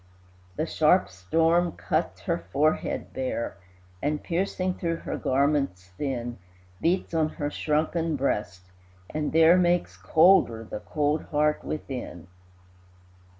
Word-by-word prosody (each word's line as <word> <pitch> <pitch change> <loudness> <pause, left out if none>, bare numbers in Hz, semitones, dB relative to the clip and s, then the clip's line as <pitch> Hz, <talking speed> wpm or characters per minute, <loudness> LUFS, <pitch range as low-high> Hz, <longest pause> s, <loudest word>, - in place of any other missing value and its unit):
The - - -1
sharp - - +3
storm 165 - +1
cuts - - -2
her - - -1
forehead 155 +6 0
bare, 130 -6 -3 0.4
And, 150 +1 -1
piercing 185 +1 -1
through 170 -2 -2
her - - -2
garments 135 -9 0
thin, 120 -1 -3 0.4
Beats 175 +1 0
on 160 -1 +2
her 145 -1 -4
shrunken 160 +2 0
breast, 95 -9 -2 0.4
and 150 -1 -2
there 165 +2 +6
Makes 175 -1 +1
colder 155 -10 +4
the 110 - -6
cold 150 +3 -1
heart 150 0 +1
within. 125 - -6
150 Hz, 115 wpm, -26 LUFS, 125-165 Hz, 0.4 s, there